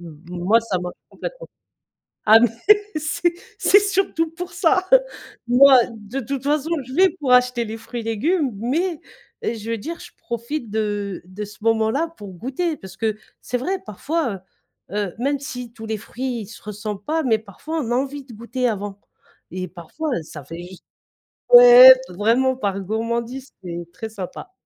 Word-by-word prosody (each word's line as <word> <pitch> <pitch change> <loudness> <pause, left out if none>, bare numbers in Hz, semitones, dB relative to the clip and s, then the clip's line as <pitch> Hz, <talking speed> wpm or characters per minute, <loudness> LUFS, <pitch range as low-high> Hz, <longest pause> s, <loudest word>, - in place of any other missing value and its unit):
M 160 -3 -12
moi, 180 +6 +2
ça 205 -5 -2
marche 180 0 -5 0.2
complètement. - - -7 0.8
Ah 220 +1 +8
mais 240 - +5 0.5
c'est 310 +3 0 0.3
c'est 405 - +6
surtout 385 -5 0
pour 355 +3 -7
ça, 360 +1 +2 0.6
moi 260 +1 +8
de 225 +4 -6
toute 270 +2 -4
façon, 295 +2 0 0.2
je 260 - -10
vais 375 +4 +5
pour 265 -3 +1
acheter 250 -1 +4
les 220 0 -6
fruits 235 +2 -7
et 225 - -8
légumes, 280 - 0
mais, 315 - -1 0.4
je 225 0 -3
veux 230 - 0
dire, 335 +9 -6
je - - -11
profite 235 +2 -5
de 205 -3 -2
de 185 +4 -7
ce 210 0 -13
moment-là 225 +7 +1
pour 200 -2 -9
goûter, 275 - -2
parce 190 0 -12
que 220 0 -1 0.3
c'est 250 - -2
vrai, 375 +10 -2
parfois, 220 - -3 0.5
heu - - -8
heu, 205 -4 -2
même 280 +3 0
si 250 -4 -7
tous 225 -1 -9
les 220 -1 -2
fruits 240 -1 -5
se 215 - -12
ressemblent 210 -1 -6
pas, 320 +1 0
mais 225 -4 +3
parfois 225 - -6
on 240 -5 -4
a - - +2
envie 275 +2 -3
de 255 - -13
goûter 240 +3 -2
avant 205 -2 -4 0.5
et 185 0 -4
parfois, 185 - -6
ça 150 -1 -10
fait 165 +4 -8
juste 180 0 -13 0.7
ouais, - - +11 0.2
vraiment 245 +5 +2
par 200 -5 -2
gourmandise, 235 +6 -3
c'est 170 -1 -6
très 220 +4 -6
sympa. 215 - -8
235 Hz, 175 wpm, -22 LUFS, 205-295 Hz, 0.8 s, ouais